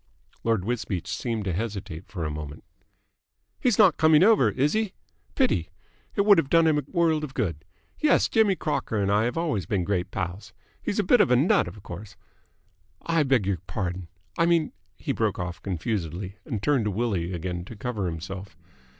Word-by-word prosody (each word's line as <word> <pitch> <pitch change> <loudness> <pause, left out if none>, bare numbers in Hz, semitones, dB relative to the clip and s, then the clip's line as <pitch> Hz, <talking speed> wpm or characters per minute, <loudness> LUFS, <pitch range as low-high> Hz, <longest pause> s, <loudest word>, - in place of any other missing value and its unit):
Lord 115 -5 +1
Wisbeach 105 -7 -2
seemed 115 -4 -3
to 95 - -1
hesitate 100 -5 -5
for 85 -6 -4
a 75 - -2
moment. 75 -1 -7 1.0
"He's 245 -6 +2
not 195 -6 +6
coming 160 +1 +6
over, 205 - +5
is 140 +7 +1
he? 215 -3 -1 0.4
Pity! 85 -1 +1 0.5
It - - +3
would 200 -3 +6
have 140 - -1
done 165 +1 +5
him 155 -2 +3
a 145 - -9
world 165 -4 +2
of 135 -3 -6
good. 80 -7 -2 0.4
Yes, 305 -2 +4
Jimmy 220 -4 +3
Crocker 145 -9 -2
and 100 0 +1
I 105 +2 +3
have 120 +4 -2
always 145 - -1
been 95 -4 0
great 90 -1 -1
pals. 95 +3 -5 0.3
He's 205 - -2
a 210 - +2
bit 235 +5 +5
of 205 - +3
a 125 - +5
nut, 180 - +3
of 105 - -10
course,... 100 +4 -9 0.9
I 165 -1 +2
beg 130 -7 +2
your 95 -3 0
pardon!... 90 -2 -3 0.3
I 165 - +4
mean.. 165 -3 +2 0.2
." - - -43
He - - -3
broke - - 0
off 90 0 -5
confusedly, 95 0 -3
and 110 -9 -4
turned 140 -7 +2
to - - +1
Willie 100 -5 -1
again 90 0 -4
to 115 - -10
cover 105 -3 -3
himself. 90 +2 -6
110 Hz, 195 wpm, -26 LUFS, -, 1.0 s, not